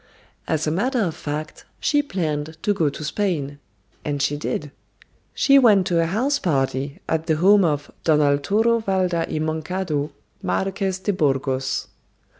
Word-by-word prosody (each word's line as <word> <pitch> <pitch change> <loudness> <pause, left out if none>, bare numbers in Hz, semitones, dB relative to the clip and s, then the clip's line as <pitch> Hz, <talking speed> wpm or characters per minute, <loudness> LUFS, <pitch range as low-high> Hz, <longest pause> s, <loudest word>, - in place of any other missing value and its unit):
As 155 -1 0
a 155 - 0
matter 245 - 0
of 170 -6 -1
fact, 150 +1 -5 0.2
she 290 0 +2
planned 160 - -3
to 205 - +2
go 165 -7 +1
to 145 - -8
Spain. 150 -4 -2 0.4
And 145 -1 -2
she 145 +1 +1
did. 150 0 -3 0.6
She 275 0 +5
went 210 -7 +5
to 170 -2 +2
a 165 - +1
house 255 - +1
party 140 -3 -1
at 160 0 -1
the 160 - +3
home 195 +5 +5
of 145 -4 -1
Don 155 -2 +4
Arturo 195 +12 +2
Valda 185 -5 0
y - - -2
Moncado, 155 -1 -2 0.3
Marques 190 -1 -1
de 195 +2 -1
Burgos. 135 -5 0
160 Hz, 155 wpm, -22 LUFS, 145-195 Hz, 0.6 s, She